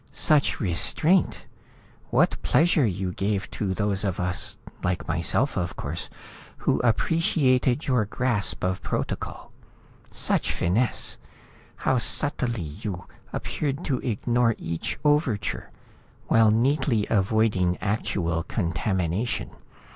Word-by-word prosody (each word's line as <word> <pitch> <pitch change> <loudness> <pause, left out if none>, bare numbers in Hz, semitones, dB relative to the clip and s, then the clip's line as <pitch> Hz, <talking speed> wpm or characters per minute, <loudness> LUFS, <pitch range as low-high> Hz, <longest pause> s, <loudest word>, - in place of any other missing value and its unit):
"Such 150 -3 +2
restraint! 150 - +1 0.6
What - - +2
pleasure 160 -5 +3
you 95 -1 -2
gave 100 +1 -1
to 95 -3 -2
those 105 0 0
of 95 -4 -1
us, 90 -1 -2 0.3
like 90 0 -1
myself 85 - 0
of 85 -3 -2
course, 75 +3 -5 0.5
who - - +1
appreciated 130 +1 +2
your 125 -6 +2
grasp 115 -1 -1
of 90 0 0
protocol. - - -4 0.6
Such - - 0
finesse! 110 +8 0 0.6
How 130 - +1
subtly 120 - -1 0.2
you 95 -4 -4 0.3
appeared 140 -1 -3
to 130 -4 0
ignore 120 0 +1
each 80 0 -3
overture, 145 -8 +1 0.6
while 115 -1 +6
neatly 120 -1 +2
avoiding 100 -3 +2
actual 90 -5 -1
contamination. 90 +3 -1
110 Hz, 105 wpm, -26 LUFS, 90-130 Hz, 0.6 s, while